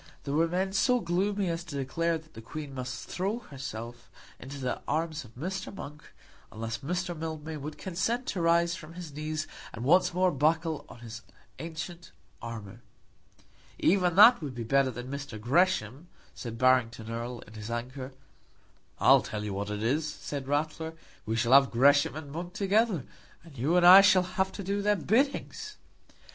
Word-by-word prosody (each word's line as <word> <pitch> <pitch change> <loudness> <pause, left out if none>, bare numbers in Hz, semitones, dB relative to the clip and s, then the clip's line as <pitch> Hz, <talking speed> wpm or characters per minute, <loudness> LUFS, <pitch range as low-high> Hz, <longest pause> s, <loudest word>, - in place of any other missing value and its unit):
There 140 - -3
were 165 +3 +3
men 190 +3 -1
so 250 +5 +3
gloomy 195 +2 0
as 165 +1 -3
to 155 -4 -7
declare 165 +5 0
that 160 0 -17
the 115 - -9
Queen 145 +4 -7
must 130 -2 -6
throw 195 +5 -2
herself 120 - -8 0.3
into 135 +2 -8
the 130 -2 -3
arms 160 -1 -1
of 115 -2 -17
Mr. 185 +9 -4
Monk, 150 -5 -9 0.5
unless 115 +1 -4
Mr. 180 +4 -3
Mildmay 160 -1 -5
would 150 +1 -7
consent 225 +7 -2
to 180 - -2
rise 170 +1 +3
from 155 0 -10
his 175 -4 -8
knees 155 +1 -3 0.3
and 115 +2 -6
once 180 +5 +4
more 180 +1 +2
buckle 160 +2 0
on 120 - -13
his 115 -2 -8 0.4
ancient 165 +2 -7 0.3
armour. 110 -4 -8 1.0
"Even 180 -2 +3
that 220 +3 +8
would 140 -5 -5
be 120 - -4
better 135 +3 +3
than 125 +3 -6 0.2
Gresham," 140 - +1 0.3
said 115 -2 -7
Barrington 115 -3 +2
Erle, 120 +1 -5
in 110 - -14
his 110 0 -7
anger. 130 +3 -5 0.9
"I'll - - +6
tell 105 -1 -5
you 105 -1 -3
what 100 +1 -3
it 105 0 -3
is," 150 +7 +1
said 140 -2 -6
Ratler, 155 +3 -1 0.3
"we 110 - 0
shall 115 +2 +2
have 135 0 +7
Gresham 140 +4 +4
and 150 -2 -7
Monk 175 +3 -6
together, 200 - +1 0.4
and 165 -4 -15
you 145 +8 +1
and 175 - +4
I 185 +2 +11
shall 190 -2 +5
have 190 +1 -1
to 200 - -6
do 200 +2 -1
their 210 +1 +3
biddings." 275 - -1
155 Hz, 175 wpm, -29 LUFS, 125-180 Hz, 1.0 s, I